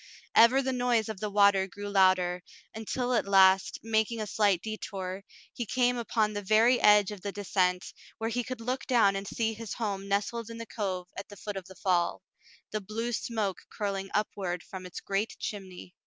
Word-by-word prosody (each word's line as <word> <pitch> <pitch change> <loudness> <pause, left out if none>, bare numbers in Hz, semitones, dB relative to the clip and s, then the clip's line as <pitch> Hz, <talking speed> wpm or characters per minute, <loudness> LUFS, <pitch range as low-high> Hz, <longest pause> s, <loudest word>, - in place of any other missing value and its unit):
Ever 255 +4 +6
the 265 0 -1
noise 245 -3 +1
of 215 -3 -5
the 210 - -2
water 200 -1 +4
grew 205 +2 -8
louder, 185 -2 +3 0.3
until 245 +3 -2
at 235 - +1
last, 190 -1 +5
making 225 +1 0
a 215 - -2
slight 200 -4 +1
detour, 195 -3 -5 0.3
he 240 - -4
came 245 +2 +2
upon 220 -3 0
the 205 - -3
very 225 +5 +4
edge 210 -1 +6
of 205 -3 -8
the 200 - -4
descent, 185 -2 0 0.2
where 225 +1 -2
he 245 +1 -1
could 255 -1 -6
look 255 +3 -3
down 225 -6 +4
and 195 0 -4
see 225 -1 -1
his 225 -1 -6
home 200 -4 -3
nestled 210 +3 -1
in 230 - -8
the 230 - -6
cove 185 -5 -4
at 195 - -7
the 205 - -11
foot 205 +2 -6
of 190 -2 -6
the 190 - -13
fall, 180 -3 0 0.5
the 215 - -2
blue 225 +4 -4
smoke 215 -4 -3
curling 195 -2 -3
upward 190 -4 -2
from 185 -1 -8
its 180 - -8
great 200 +3 -2
chimney. 185 -3 -7
205 Hz, 195 wpm, -29 LUFS, 195-225 Hz, 0.5 s, Ever